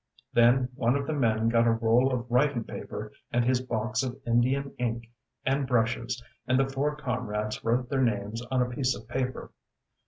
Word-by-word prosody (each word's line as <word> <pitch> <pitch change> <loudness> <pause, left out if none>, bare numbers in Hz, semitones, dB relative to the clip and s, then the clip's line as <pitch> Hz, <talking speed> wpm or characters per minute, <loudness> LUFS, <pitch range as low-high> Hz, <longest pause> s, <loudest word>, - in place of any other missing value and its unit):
ŌĆØ - - -33
Then 125 +2 +5
one 125 0 +1
of 140 0 -1
the 155 - -2
men 115 -5 +2
got 115 0 +3
a - - +5
roll 115 +3 +3
of 125 -2 -1
writing 125 -1 +2
paper - - -7 0.2
and 120 0 +2
his 125 0 +2
box 115 -1 -1
of 130 0 -4
Indian 130 +4 +1
ink 115 -1 -2 0.3
and 135 0 +1
brushes, 120 0 0 0.2
and 130 +1 +3
the 135 - +3
four 140 +2 -1
comrades 115 -7 -3
wrote 120 +2 +1
their 135 +1 0
names 110 -1 -1
on 130 -2 +2
a 125 - -3
piece 130 0 0
of 110 - -11
paper. 125 +1 -3
125 Hz, 190 wpm, -28 LUFS, 115-130 Hz, 0.3 s, Then